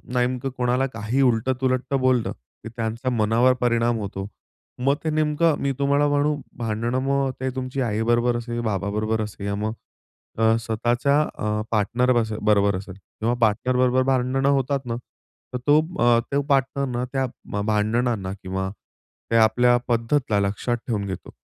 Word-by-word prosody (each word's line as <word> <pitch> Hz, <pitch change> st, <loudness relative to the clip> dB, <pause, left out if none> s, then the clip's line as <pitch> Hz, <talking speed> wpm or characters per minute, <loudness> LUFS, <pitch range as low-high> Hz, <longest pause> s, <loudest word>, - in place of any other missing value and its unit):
नेमकं 125 Hz, +1 st, 0 dB
कोणाला 125 Hz, +1 st, +1 dB
काही 115 Hz, +5 st, -1 dB
उलट-तुलट 130 Hz, +2 st, +1 dB
बोललं 130 Hz, -3 st, +2 dB, 0.3 s
की -, -, -6 dB
त्यांचा 115 Hz, +2 st, -2 dB
मनावर 115 Hz, +2 st, +3 dB
परिणाम 120 Hz, -1 st, +2 dB
होतो. 95 Hz, -1 st, -5 dB, 0.6 s
मग 140 Hz, +1 st, +3 dB
ते 160 Hz, -, 0 dB
नेमकं 155 Hz, +1 st, +2 dB
मी 140 Hz, -, +1 dB
तुम्हाला 140 Hz, +1 st, +3 dB
म्हणू, 145 Hz, +1 st, +2 dB, 0.2 s
भांडणं 115 Hz, +2 st, -1 dB
मग 140 Hz, 0 st, +1 dB
ते 130 Hz, 0 st, -1 dB
तुमची 130 Hz, +1 st, -3 dB
आई 110 Hz, -3 st, 0 dB
बरोबर 120 Hz, +1 st, +2 dB
असेल 120 Hz, 0 st, -4 dB
बाबा 100 Hz, -3 st, -1 dB
बरोबर 110 Hz, +1 st, -1 dB
असेल, 105 Hz, -1 st, -7 dB
या 100 Hz, -, -1 dB
मग 110 Hz, +2 st, -2 dB, 0.7 s
अ, 110 Hz, 0 st, +4 dB
स्वतःच्या 120 Hz, +5 st, +1 dB
अ, 105 Hz, -7 st, -2 dB
पार्टनर 120 Hz, +4 st, +2 dB
बसेल 110 Hz, -1 st, -4 dB
बरोबर 100 Hz, -1 st, +3 dB
असेल 95 Hz, -1 st, -9 dB
किंवा 110 Hz, +6 st, -3 dB
पार्टनर 115 Hz, +3 st, +2 dB
बरोबर 130 Hz, 0 st, +3 dB
भांडणं 130 Hz, +2 st, +1 dB
होतात 140 Hz, -1 st, +1 dB
ना? 115 Hz, -1 st, -2 dB, 0.6 s
तर -, -, 0 dB
तो 145 Hz, +1 st, +6 dB, 0.2 s
अ, 120 Hz, -1 st, +5 dB
तो 140 Hz, +1 st, +2 dB
पार्टनरना 135 Hz, -2 st, 0 dB
त्या 135 Hz, -1 st, +1 dB, 0.4 s
भांडणांना 110 Hz, -1 st, 0 dB
किंवा 95 Hz, +1 st, -3 dB, 0.6 s
त्या 115 Hz, -1 st, +5 dB
आपल्या 120 Hz, +3 st, +4 dB
पद्धतला 115 Hz, -1 st, +1 dB
लक्षात 100 Hz, +5 st, -1 dB
ठेवून 105 Hz, -4 st, -1 dB
घेतो. 95 Hz, -1 st, -7 dB
120 Hz, 155 wpm, -23 LUFS, 110-130 Hz, 0.7 s, तो